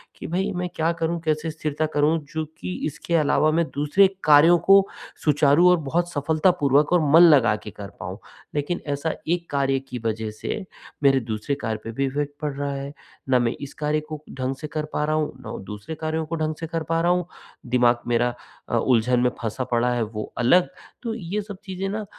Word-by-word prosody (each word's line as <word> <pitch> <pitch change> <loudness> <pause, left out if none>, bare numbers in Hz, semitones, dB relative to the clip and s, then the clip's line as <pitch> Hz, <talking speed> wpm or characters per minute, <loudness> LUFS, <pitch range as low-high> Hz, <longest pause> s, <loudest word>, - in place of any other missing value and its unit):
कि - - -8
भई 190 +4 -1
मैं 180 0 -2
क्या 165 +1 +1
करूँ? 165 +1 -2
कैसे 155 0 -1
स्थिरता 155 0 -2
करूँ? 150 +3 +3
चूँकि 155 - -5
इसके 170 +3 -3
अलावा 155 0 +3
मैं 165 +2 +2
दूसरे 150 +7 +4 0.2
कार्यों 155 +3 +7
को 195 0 +7 0.4
सुचारू 150 +3 +5
और 180 - +5
बहुत 175 +3 0
सफलतापूर्वक 150 -1 +2
और 175 - +5
मन 165 - +9
लगा 130 -10 +6
के 105 - -7
कर 100 +1 -9
पाऊँ। 95 +3 -6 0.4
लेकिन 145 +5 -1
ऐसा 155 +3 -2
एक 170 +1 -1
कार्य 135 -1 +1
की 125 - -5
वज़ह 110 0 -1
से, 215 - -3 0.4
मेरे 135 -1 +5
दूसरे 110 +6 -2
कार्य 110 -1 -2
पे 115 - -5
भी 135 +4 -1
इफेक्ट 145 +1 -3
पड़ 150 -2 -2
रहा 140 0 -3
है, 140 +1 -5 0.4
ना 125 - +4
मैं 120 0 0
इस 140 - -7
कार्य 150 +1 +1
को 155 -1 -7 0.2
ढंग 130 +1 -1
से 150 - -4
कर 150 - -1
पा - - 0
रहा 155 - 0
हूँ, 155 -1 -1
ना - - -6
दूसरे 105 +11 -7
कार्यों 160 0 -1
को 165 +2 -4
ढंग 155 -1 -1
से 165 - -4
कर 165 0 -3
पा 165 0 +2
रहा 175 +1 +3
हूँ, 180 -1 +1 0.4
दिमाग 120 -1 +3
मेरा 120 0 +1 0.4
अ, - - +1
उलझन 125 0 +2
में 125 0 +3
फँसा 115 +2 -2
पड़ा 120 +1 +2
है। 120 - 0
वो 105 0 -5
अलग, 175 +10 +4 0.4
तो 230 -2 -2
ये 205 -1 -3
सब 205 -1 -9
चीज़ें 190 0 -4
ना 210 +1 -3
150 Hz, 210 wpm, -24 LUFS, 130-165 Hz, 0.4 s, मन